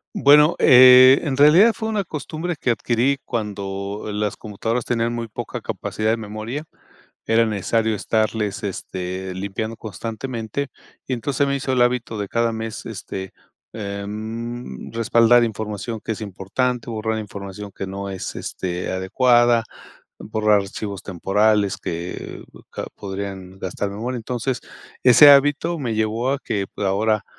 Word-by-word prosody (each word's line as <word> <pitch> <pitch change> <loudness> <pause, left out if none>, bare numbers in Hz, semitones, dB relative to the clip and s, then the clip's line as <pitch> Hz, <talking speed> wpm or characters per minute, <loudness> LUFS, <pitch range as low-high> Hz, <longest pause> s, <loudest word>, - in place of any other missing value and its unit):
Bueno, 150 +3 +6
eh, 130 +1 +8
en 140 -4 -2
realidad 165 +10 +7
fue 220 +2 -4
una 215 -2 -1
costumbre 160 +1 -5
que 125 - +1
adquirí 120 +3 +1
cuando 100 -3 -4
las 105 0 -2
computadoras 115 +3 -3
tenían 115 0 -1
muy 115 -1 -4
poca - - -6
capacidad 110 0 -3
de 115 - +2
memoria. 110 +7 -6 0.6
Era 115 +1 +4
necesario 110 +1 0
estarles, 110 0 -1
este, 95 -1 -5
limpiando 100 +4 -4
constantemente. 115 +5 -5 0.4
Y 130 - -4
entonces, 130 +3 -2
se 140 - +3
me 140 0 0
hizo 130 -1 -2
el 125 -1 +3
hábito 120 -2 0
de 100 - -3
cada 115 +1 +1
mes, 110 0 -6
este, 95 -3 -6 0.4
em, 110 - -6
respaldar 115 +1 +4
información 110 0 -4
que 110 - -2
es 110 - -7
importante, 115 +6 -2
borrar 110 -1 -2
información 100 -1 -7
que 95 - -5
no 100 +1 -5
es, 95 -2 -5
este, 90 -1 -4
adecuada, 120 +5 +3 0.6
borrar 105 -2 +2
archivos 100 0 -6
temporales 100 +2 +1
que 85 +1 -6 0.3
ca - - -5
podrían 95 -1 -7
gastar 95 +2 -3
memoria. 115 +6 -4
Entonces, 125 +1 -3 0.4
ese 135 +4 +9
hábito 145 +4 +4
me 120 -6 -2
llevó 110 +4 0
a 140 - -1
que 100 -7 -2
ahora 105 +1 +1
110 Hz, 140 wpm, -22 LUFS, 100-125 Hz, 0.6 s, ese